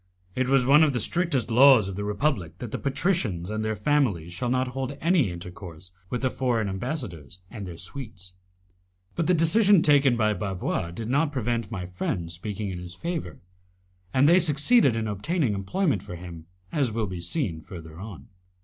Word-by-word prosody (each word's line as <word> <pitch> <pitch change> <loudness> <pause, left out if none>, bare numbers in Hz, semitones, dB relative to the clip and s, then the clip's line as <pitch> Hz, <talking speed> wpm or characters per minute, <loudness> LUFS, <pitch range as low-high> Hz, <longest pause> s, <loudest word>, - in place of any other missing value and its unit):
It 130 +3 -1
is 135 -2 +4
one 145 +4 +6
of 150 -3 +3
the 120 - 0
strictest 140 - +1
laws 125 -3 +7
of 95 - -5
the 105 - -4
Republic 105 - -1
that 120 -3 -7
the - - -3
patricians 135 - -1
and 110 0 -2
their 110 0 -1
families 105 - 0
shall 125 +6 -2
not 130 +1 +1
hold 135 +2 -4
any 165 - +2
intercourse 90 0 -9 0.2
with 125 +1 -3
the 130 - +1
foreign 120 -5 0
ambassadors 95 - -5
and 105 -5 -7
their 85 -2 -8
suites. 95 -3 -8 0.8
But 170 - -1
the 180 - +4
decision 185 +3 +4
taken 140 -4 +4
by 110 -2 +2
Bavois 95 -4 -2
did 110 +6 -6
not 145 +5 +1
prevent 120 -4 -2
my 95 -5 -5
friends 90 -1 -3
speaking 100 +3 -4
in 90 - -5
his 90 0 -9
favour, 170 - -5 0.7
and 130 +6 +4
they 175 +3 +6
succeeded 155 - +3
in 110 -1 -2
obtaining 115 - -1
employment 110 - 0
for 100 -3 -8
him, 85 -2 -10 0.2
as 135 -6 +1
will 110 0 -1
be 90 -3 -6
seen 85 - -2
further 80 -1 -10
on. 95 -9 -9
110 Hz, 185 wpm, -26 LUFS, 90-140 Hz, 0.8 s, laws